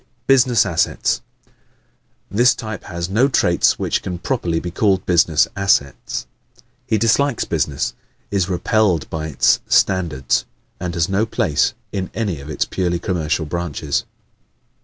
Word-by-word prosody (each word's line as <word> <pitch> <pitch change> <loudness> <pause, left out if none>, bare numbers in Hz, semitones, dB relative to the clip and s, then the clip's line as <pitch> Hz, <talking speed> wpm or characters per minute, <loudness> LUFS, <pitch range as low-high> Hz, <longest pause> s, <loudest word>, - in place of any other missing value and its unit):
Business 125 -4 +4
Assets 80 -2 0 0.3
¶ - - -32 0.8
This 120 +5 +4
type 110 -2 -7
has 85 -1 -4
no 110 +8 +3
traits 85 -10 +2
which - - -1
can 90 -1 -4
properly 85 -6 -1
be 90 - -5
called 95 -1 +1
business 85 -3 +3
assets. 100 -8 0 0.6
He 110 - +2
dislikes 115 +4 +2
business, 75 -4 -1 0.4
is 100 -2 0
repelled 95 -2 +1
by 80 -1 -3
its 75 - +3
standards 85 -9 +1 0.3
and 90 -1 -4
has 85 -1 +1
no 100 +3 0
place 80 - +1 0.2
in 95 -2 -3
any 100 -9 -2
of 70 - -10
its 75 - -1
purely 90 -2 -1
commercial 85 -2 -1
branches. 75 -3 -2
90 Hz, 140 wpm, -20 LUFS, 80-105 Hz, 0.8 s, Business